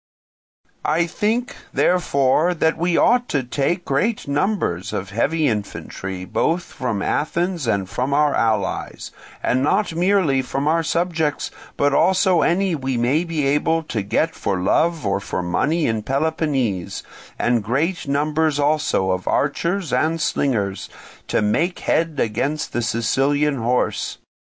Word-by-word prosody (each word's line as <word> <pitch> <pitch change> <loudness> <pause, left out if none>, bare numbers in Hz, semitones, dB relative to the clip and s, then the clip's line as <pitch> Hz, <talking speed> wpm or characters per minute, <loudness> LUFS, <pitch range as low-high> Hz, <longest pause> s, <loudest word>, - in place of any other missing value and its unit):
"I 165 +3 +2
think, 220 +8 -1 0.2
therefore, 170 -1 +2
that 160 0 +2
we 175 0 0
ought 245 +1 +3
to 140 -3 0
take 145 +8 -1
great 195 +11 0
numbers 140 - -1
of 95 +1 -4
heavy 155 +9 +1
infantry, 95 -3 -4
both 165 - 0
from 115 - -3
Athens 170 -1 -1
and 100 -4 0
from 125 +7 -2
our 150 +1 +3
allies, 110 -4 -1 0.3
and 130 - +1
not 165 +6 +1
merely 175 -6 +2
from 135 +3 -3
our 165 +2 +3
subjects, 165 -2 -1 0.3
but 145 0 +2
also 185 +1 +3
any 185 +2 +2
we 135 -4 -2
may 130 +8 +2
be 165 -4 -2
able 155 +4 +1
to 110 - 0
get 155 +11 0
for 95 -2 -2
love 160 - +1
or 100 0 +1
for 90 - -4
money 150 - 0
in 110 -2 0
Peloponnese, 135 - -1 0.3
and 120 -3 +1
great 145 - -1
numbers 150 +2 +1
also 145 -10 +1
of 95 0 -3
archers 170 +2 0
and 155 +6 +1
slingers, 105 -11 -1 0.4
to - - +1
make 165 - +1
head 160 -3 0
against 135 +8 -1
the 120 - 0
Sicilian 135 +6 +1
horse. 120 +1 -1
145 Hz, 140 wpm, -21 LUFS, 120-165 Hz, 0.4 s, ought